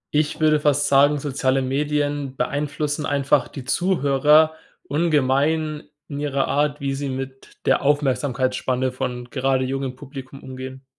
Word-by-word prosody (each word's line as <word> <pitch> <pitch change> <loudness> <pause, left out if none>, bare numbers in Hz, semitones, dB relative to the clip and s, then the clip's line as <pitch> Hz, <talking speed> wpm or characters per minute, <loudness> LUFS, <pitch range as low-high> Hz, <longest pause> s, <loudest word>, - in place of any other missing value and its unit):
Ich 150 +1 +1
würde 155 -1 +4
fast 145 -1 +2
sagen, 145 +2 +5
soziale 135 -1 0
Medien 145 0 -1
beeinflussen 145 +3 -2
einfach 140 -1 +2
die 135 - -8
Zuhörer 155 -2 +3 0.3
ungemein 150 0 +1 0.2
in 145 -1 -6
ihrer 140 -2 0
Art, 145 +1 0
wie 140 -1 -2
sie 140 0 -3
mit 135 0 -7
der - - +3
Aufmerksamkeitsspanne 130 -2 0
von 125 -1 -5
gerade 130 -1 +1
jungem 135 -1 -3
Publikum 135 0 -10
umgehen. 130 0 -8
140 Hz, 130 wpm, -22 LUFS, 130-150 Hz, 0.3 s, sagen